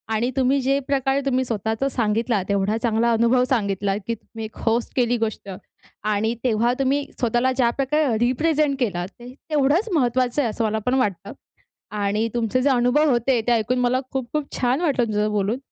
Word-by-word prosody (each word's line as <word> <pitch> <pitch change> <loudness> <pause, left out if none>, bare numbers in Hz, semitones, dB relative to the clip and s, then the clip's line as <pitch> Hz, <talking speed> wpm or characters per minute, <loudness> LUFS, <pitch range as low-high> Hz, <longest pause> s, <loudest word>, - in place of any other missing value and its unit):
आणि 235 +3 0
तुम्ही 270 +1 +2
जे 275 +2 +1
प्रकारे 270 0 +1
तुम्ही 260 -1 +1
स्वतःचं 225 +2 -2
सांगितला, 225 -2 0
एवढा 200 +2 +1
चांगला 235 0 +2
अनुभव 235 +2 +3
सांगितला, 200 -5 0
की 230 +3 -4
तुम्ही 225 0 -9
एक 215 - -11
होस्ट 230 +1 +1
केली 245 -1 +2
गोष्ट. 220 -3 -3 0.5
आणि 215 +2 0
तेव्हा 235 0 +2
तुम्ही 275 +2 +1 0.2
स्वतःला 240 +2 +1
ज्या 255 -2 +2
प्रकारे 275 -3 +1
रिप्रेझेंट 290 +4 +1
केलात, 180 -8 -1
ते 245 +1 -10 0.2
तेवढंच 305 +8 +2
महत्त्वाचं 255 -2 +1
आहे, 240 - 0
असं 225 +2 -3
मला 220 0 0
पण 250 - +1
वाटतं. 200 -8 -2 0.6
आणि 205 +2 0
तुमचे 240 +1 0
जे 280 - +2
अनुभव 260 +4 +3
होते, 245 0 +2
ते - - +3
ऐकून 235 +2 +1
मला 250 +1 +2
खूप-खूप 270 +3 -3
छान 255 +4 +1
वाटलं, 285 -7 +1
तुमच्या 210 -2 -1
सोबत 210 - 0
बोलून. 205 +3 0
240 Hz, 180 wpm, -22 LUFS, 220-265 Hz, 0.6 s, अनुभव